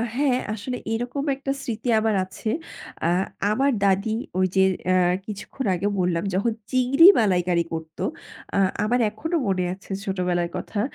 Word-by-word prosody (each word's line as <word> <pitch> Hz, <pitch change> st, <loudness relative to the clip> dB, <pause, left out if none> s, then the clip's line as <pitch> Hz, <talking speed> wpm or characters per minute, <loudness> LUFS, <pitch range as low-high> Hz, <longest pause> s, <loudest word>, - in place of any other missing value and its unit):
হ্যাঁ, 270 Hz, -2 st, +2 dB
আসলে 250 Hz, +4 st, -4 dB, 0.2 s
এরকম 245 Hz, +4 st, -2 dB
একটা 275 Hz, 0 st, -3 dB
স্মৃতি 235 Hz, -2 st, -4 dB
আমার 220 Hz, -1 st, +1 dB
আছে। 200 Hz, +3 st, -5 dB, 0.6 s
আ -, -, +3 dB, 0.4 s
আমার 270 Hz, +6 st, +2 dB
দাদি 195 Hz, +2 st, +2 dB, 0.3 s
ওই 185 Hz, -, +4 dB
যে, 190 Hz, -, +5 dB, 0.2 s
অ্যাঁ 180 Hz, -1 st, +3 dB
কিছুক্ষণ 215 Hz, +5 st, -6 dB
আগে 195 Hz, +4 st, -1 dB
বললাম 175 Hz, -1 st, +1 dB
যখন 200 Hz, +5 st, +1 dB, 0.2 s
চিংড়ি 260 Hz, +6 st, +6 dB
মালাইকারি 180 Hz, -5 st, +2 dB
করতো। 160 Hz, -1 st, -5 dB, 0.5 s
আ -, -, +2 dB, 0.3 s
আমার 245 Hz, +4 st, +1 dB
এখনো 320 Hz, +11 st, -4 dB
মনে 185 Hz, -2 st, +1 dB
আছে 195 Hz, +1 st, -13 dB
ছোটবেলার 180 Hz, -3 st, 0 dB
কথা। 210 Hz, -, -4 dB
205 Hz, 150 wpm, -24 LUFS, 185-250 Hz, 0.6 s, চিংড়ি